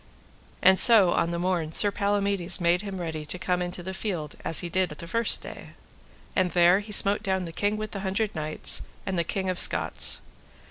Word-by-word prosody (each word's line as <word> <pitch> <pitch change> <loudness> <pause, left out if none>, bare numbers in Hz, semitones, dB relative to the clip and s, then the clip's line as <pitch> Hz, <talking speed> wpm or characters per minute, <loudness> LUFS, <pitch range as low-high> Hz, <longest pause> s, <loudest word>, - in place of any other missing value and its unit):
And 190 +1 +5
so 210 -7 +7
on 170 - 0
the 170 - -4
morn 170 -3 -2
Sir 205 +4 +2
Palamides 200 -3 -1
made 175 +1 +1
him 195 -2 -7
ready 160 -3 -5
to 180 - -5
come 180 -1 -2
into 175 0 -5
the 190 +2 -6
field 175 -7 -5
as 165 - +2
he 175 - -5
did 185 +1 -1
the 150 +2 -10
first 230 +7 -1
day. - - -11 0.6
And 185 -1 +1
there 175 +2 +4
he 210 +1 -10
smote 200 0 +4
down 190 -3 -2
the 165 - -8
King 205 +5 -2
with 215 0 -6
the 200 - -6
Hundred 195 +2 -3
Knights, 155 -1 +1 0.2
and 190 -2 -3
the - - +1
King 190 +3 -4
of 185 -1 -2
Scots. - - +3
185 Hz, 205 wpm, -25 LUFS, 170-200 Hz, 0.6 s, so